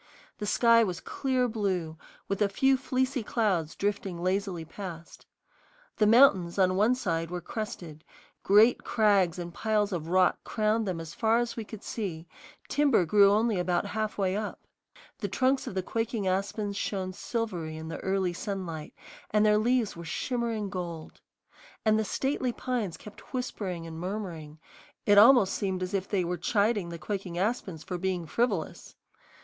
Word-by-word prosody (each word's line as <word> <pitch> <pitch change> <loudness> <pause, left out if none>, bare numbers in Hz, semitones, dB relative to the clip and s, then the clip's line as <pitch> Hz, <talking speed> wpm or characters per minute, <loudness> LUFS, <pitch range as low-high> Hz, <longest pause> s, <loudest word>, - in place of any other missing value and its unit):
The 210 - -3
sky 230 +2 +5
was 180 -5 -2
clear 260 -2 -1
blue, 190 -8 -2 0.3
with 200 +1 -2
a 205 - +3
few 270 +6 +3
fleecy 260 0 -1
clouds 200 -8 0
drifting 200 -3 -2
lazily 185 -2 -1
past. 170 -1 -9 0.7
The 210 - +4
mountains 205 -8 +5
on 185 -1 +3
one 215 +6 +3
side 165 -9 -2
were 180 0 -3
crested; 175 -6 -6 0.4
great 215 +5 +5
crags 200 -6 +2
and 175 -1 -6
piles 215 0 0
of 165 -4 -3
rock 185 +1 +2
crowned 215 0 0
them 180 -3 -2
as 165 -1 -7
far 225 +1 +2
as 240 0 -1
we 225 - -4
could 215 -1 -10
see; 175 -7 -5 0.4
timber 280 -10 +3
grew 200 +4 +6
only 215 -1 +2
about 180 +1 0
halfway 210 -3 -1
up. 210 0 -5 0.5
The - - -2
trunks 260 +1 +1
of - - -5
the 190 - -1
quaking 225 -1 -2
aspens 200 +2 -1
shone 190 -2 -3
silvery 180 -8 -4
in 160 0 -7
the 165 - -5
early 190 -2 0
sunlight, 175 -5 -5 0.3
and 210 0 +3
their 210 0 +4
leaves 240 -1 +1
were 170 - -8
shimmering 225 +3 -2
gold. 170 -3 -6 0.6
And 215 0 +4
the - - +1
stately 265 +2 -1
pines 235 -8 -3
kept 210 +5 -12
whispering 190 -9 -4
and 165 -1 -7
murmuring; 175 -5 -5 0.5
it 205 -1 +7
almost 230 -3 +7
seemed 190 -2 -2
as 185 +2 -5
if 195 -1 -1
they 195 -3 0
were 175 +1 -2
chiding 205 +1 +1
the 170 - -6
quaking 180 +1 -4
aspens 190 -5 -2
for 180 -1 -5
being 185 -2 -1
frivolous. 205 -3 -2
200 Hz, 165 wpm, -28 LUFS, 175-220 Hz, 0.7 s, it